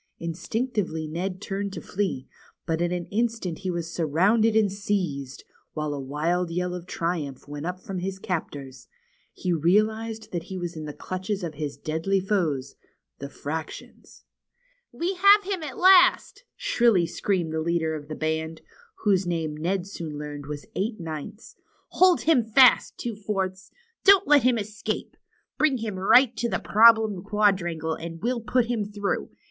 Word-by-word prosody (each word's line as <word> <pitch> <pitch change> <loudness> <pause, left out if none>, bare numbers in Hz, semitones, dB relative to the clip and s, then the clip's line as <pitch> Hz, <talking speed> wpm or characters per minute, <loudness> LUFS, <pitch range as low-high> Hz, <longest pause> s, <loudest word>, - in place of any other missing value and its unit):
Instinctively 170 0 -3
Ned 180 +4 -4
turned 200 0 -3
to - - -5
flee, 190 -9 -3 0.4
but 165 0 -1
in 175 0 0
an 175 -1 -2
instant 225 -6 -1
he 190 - -4
was 170 -1 -4
surrounded 200 +8 +2
and 215 -3 +3
seized, 180 -10 -3 0.3
while 150 -1 -2
a 145 - -4
wild 160 +6 -1
yell 180 +1 -2
of 180 0 -7
triumph 160 -8 -3
went 145 +2 -6
up 180 0 -4
from 190 0 -6
his 190 +1 -4
captors. 145 -8 -5 0.4
He 180 -2 -2
realized 215 +6 +1
that 175 -2 -4
he 190 - -6
was 175 -1 -5
in 155 -1 -6
the 150 - -6
clutches 185 +4 -4
of 165 -2 -4
his 145 -1 -5
deadly 165 +5 -1
foes, 175 -9 -1 0.5
the 140 - -6
fractions. 155 +3 -7 0.7
^^We 360 +3 -3
have 400 +2 +7
him 385 -2 -3
at 290 -4 -6
last!" 375 +6 +5
shrilly 230 -8 +3
screamed 175 -2 -1
the 160 - -1
leader 160 -1 0
of 150 -2 -6
the 155 - -5
band, 160 0 -3 0.4
whose 195 -4 +2
name 165 -3 -2
Ned 175 +4 -1
soon 165 -6 -7
learned 145 -1 -7
Avas 145 0 -6
Eight 215 +2 -2
Ninths, 165 +6 -7 0.3
Hold 370 -1 +4
him 305 -7 +3
fast. 240 +3 +5
Two 235 -3 -4
Fourths. 195 -2 -3 0.3
Don't 395 -1 +6
let 295 -1 +6
him 250 0 +3
escape. 210 0 -4 0.4
Bring 295 -4 +3
him 220 -3 -4
right 245 +7 +6
up 235 - -31
to 235 0 -1
Problem 220 -3 +5
Quadrangle, 190 -6 +1
and 165 +1 -7
we'll 240 +4 -1
put 245 +2 +1
him 235 -3 -1
through. 205 0 -3
185 Hz, 165 wpm, -25 LUFS, 160-220 Hz, 0.7 s, have